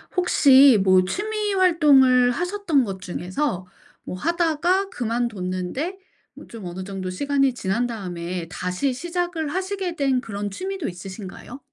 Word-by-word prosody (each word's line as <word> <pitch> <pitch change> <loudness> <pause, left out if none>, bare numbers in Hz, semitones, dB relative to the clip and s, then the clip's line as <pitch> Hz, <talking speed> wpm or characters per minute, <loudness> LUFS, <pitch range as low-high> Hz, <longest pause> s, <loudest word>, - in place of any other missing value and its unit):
혹시 275 - +6
뭐 185 -1 +5
취미 420 - -2
활동을 280 -9 +5
하셨던 355 -1 0
것 195 -4 -6
중에서 185 +3 -3 0.4
뭐 - - -6
하다가 340 - +1
그만뒀는데 230 - -3 0.4
뭐 - - -13
좀 225 -5 -10
어느 180 +2 -6
정도 190 -1 -5
시간이 275 +6 +1
지난 230 +3 -1
다음에 180 -6 -5
다시 180 +9 -2
시작을 345 +1 -3
하시게 375 +1 -3
된 270 -4 +1
그런 205 -3 -5
취미도 380 - -4
있으신가요? 190 +7 -9
255 Hz, 290 characters per minute, -23 LUFS, -, 0.4 s, 혹시